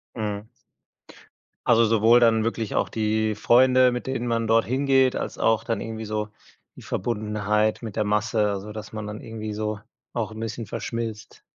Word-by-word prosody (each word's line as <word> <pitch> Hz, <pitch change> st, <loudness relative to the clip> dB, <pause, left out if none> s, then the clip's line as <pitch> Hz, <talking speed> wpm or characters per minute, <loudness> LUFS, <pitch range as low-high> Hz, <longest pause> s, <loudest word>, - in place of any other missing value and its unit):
Mhm. 105 Hz, -1 st, -4 dB, 1.2 s
Also, 115 Hz, -1 st, +5 dB
sowohl 115 Hz, +1 st, +5 dB
dann 115 Hz, -2 st, +4 dB
wirklich 115 Hz, -1 st, -2 dB
auch -, -, +1 dB
die 110 Hz, -1 st, 0 dB
Freunde, 125 Hz, +2 st, +5 dB
mit 125 Hz, +1 st, -4 dB
denen 125 Hz, -2 st, -2 dB
man 115 Hz, -1 st, 0 dB
dort 115 Hz, 0 st, +4 dB
hingeht, 130 Hz, 0 st, +2 dB
als -, -, -4 dB
auch 115 Hz, 0 st, +2 dB
dann 115 Hz, 0 st, -2 dB
irgendwie 110 Hz, 0 st, -5 dB
so 105 Hz, 0 st, -3 dB, 0.5 s
die -, -, -13 dB
Verbundenheit 105 Hz, 0 st, -1 dB
mit 110 Hz, -3 st, -6 dB
der 110 Hz, -, +1 dB
Masse, 105 Hz, 0 st, +1 dB
also, 100 Hz, +1 st, -5 dB
dass 105 Hz, 0 st, -8 dB
man 110 Hz, -1 st, -5 dB
dann 105 Hz, 0 st, -6 dB
irgendwie 110 Hz, -1 st, -6 dB
so 105 Hz, -1 st, -3 dB, 0.3 s
auch -, -, -3 dB
'n 110 Hz, -, -8 dB
bisschen 115 Hz, 0 st, -4 dB
verschmilzt. 115 Hz, +1 st, -5 dB
110 Hz, 170 wpm, -24 LUFS, 105-115 Hz, 1.2 s, Also